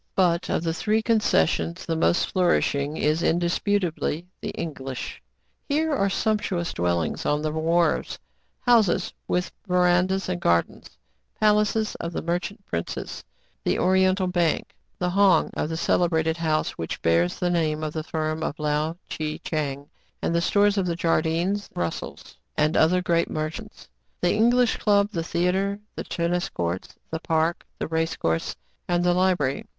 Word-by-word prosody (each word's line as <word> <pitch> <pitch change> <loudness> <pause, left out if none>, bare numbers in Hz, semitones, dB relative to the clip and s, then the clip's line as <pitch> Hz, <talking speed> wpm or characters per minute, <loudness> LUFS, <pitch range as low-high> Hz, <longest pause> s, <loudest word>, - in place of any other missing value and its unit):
' - - -49
But, 175 -2 +2
of. - - 0
the 165 -1 0
three 215 +6 0
concessions, 85 - +1
the 165 - -1
most 165 +2 +2
flourish 180 -2 +2
ing 145 +2 -2
is 155 +2 +1
indisputably 175 -1 0 0.2
the - - -4
English. 135 -5 -5 0.5
Here 310 +2 +1
are 200 -8 +2
sump 215 +2 +1
tuous 175 -3 -2
dwellings 85 -2 -1
on 150 +1 0
the 155 - 0
wharves, 165 +2 +1 0.4
houses 225 -7 +3
with 180 0 0 0.2
verandas 180 +1 +2
and 180 -1 -2
gardens, 85 0 0 0.4
palaces 210 0 +2
of 170 0 -4
the - - -3
merchant 180 +4 -3
princes, 85 0 -4 0.4
the - - +1
Oriental 190 +1 +3
Bank, 175 -3 0 0.2
the 180 0 -1
"hong" 195 -1 +4
of 150 - -2
the 160 - -3
cele 175 +1 +2
brated 160 0 0
house 155 -2 0
which 80 - -4
bears 85 +1 +2
the 175 -1 0
name 155 -3 0
of 155 -1 -3
the 160 - -2
firm 155 0 -2
of 155 -1 -3
Lao 150 +2 -1
Tchi 155 -1 -3
Tchang, 145 -3 -3 0.3
the 170 0 0
stores 205 +2 +3
of 185 - 0
the 170 - 0
Jardynes, 170 +4 0
Rus 85 -1 -1
sels, - - -10 0.2
and 155 +2 +2
other 180 +3 +4
great 170 -1 +1
merchants, 155 0 -5 0.3
the 175 - +2
English 240 +2 +3
club, 205 -1 +2
the 165 -5 -2
theatre, 185 +4 0 0.2
the - - -4
tennis 175 +2 -1
court, 85 - -3 0.2
the 160 - -2
park, 160 +1 0
the - - -3
race 160 0 -1
course, 80 0 -1 0.3
and 175 0 +1
the 180 0 +3
library. 180 -7 +1
170 Hz, 160 wpm, -25 LUFS, 155-190 Hz, 0.5 s, hong